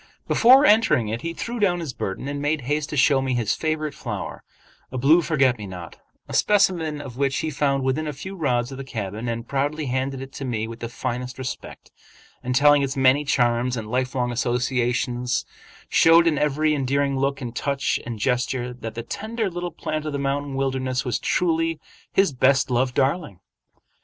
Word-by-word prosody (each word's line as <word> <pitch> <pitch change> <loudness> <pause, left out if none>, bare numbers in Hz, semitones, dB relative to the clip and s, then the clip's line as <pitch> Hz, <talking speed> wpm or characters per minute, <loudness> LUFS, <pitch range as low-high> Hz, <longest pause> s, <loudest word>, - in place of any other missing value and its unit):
Before 260 +5 +6
entering 180 - +4
it 115 +2 -3
he 165 - -3
threw 235 +7 -5
down 180 -4 +2
his 160 -6 -5
burden 95 +6 -4
and 145 0 -3
made 145 0 0
haste 150 +3 -2
to 150 - -4
show 140 0 +4
me 130 -1 -1
his 115 -4 +1
favorite 155 -1 -2
flower, - - -6 0.5
a 130 - -4
blue 150 +7 +5
forget 135 -7 +2
me 105 - -6
not, 90 -3 -9 0.3
a - - -8
specimen 180 -7 +2
of 135 -4 -8
which 135 0 +1
he 160 - -2
found 140 -1 0
within 135 +4 0
a - - -1
few 190 +9 -8
rods 125 -7 0
of 135 - -7
the - - -4
cabin, 110 -3 -5
and 115 0 -3
proudly 145 +3 -1
handed 130 +1 -2
it 135 0 -8
to - - -6
me 115 -4 -2
with 115 +1 -8
the 115 - -5
finest 125 +1 -4
respect, 130 -1 -7 0.5
and 125 0 -2
telling 145 +1 +6
its 135 0 -2
many 130 +2 +4
charms 120 -2 +1
and 110 -1 -6
lifelong 125 -1 0
associations, 125 0 0 0.4
showed 165 +1 +6
in 160 -4 +2
every 150 +1 +2
endearing 140 0 0
look 135 +1 0
and 120 -3 -6
touch 140 +1 0
and 115 -1 -5
gesture 125 +2 -1
that 115 -2 -7
the 115 - -4
tender 215 - -3
little 175 0 -4
plant 155 -2 -4
of 150 - -3
the - - -1
mountain 140 0 -2
wilderness 130 -1 -1
was 125 - -1
truly 165 -2 0 0.3
his 195 -6 +3
best 130 +1 +3
loved 125 +1 +1
darling. 135 - 0
135 Hz, 190 wpm, -23 LUFS, 125-150 Hz, 0.5 s, Before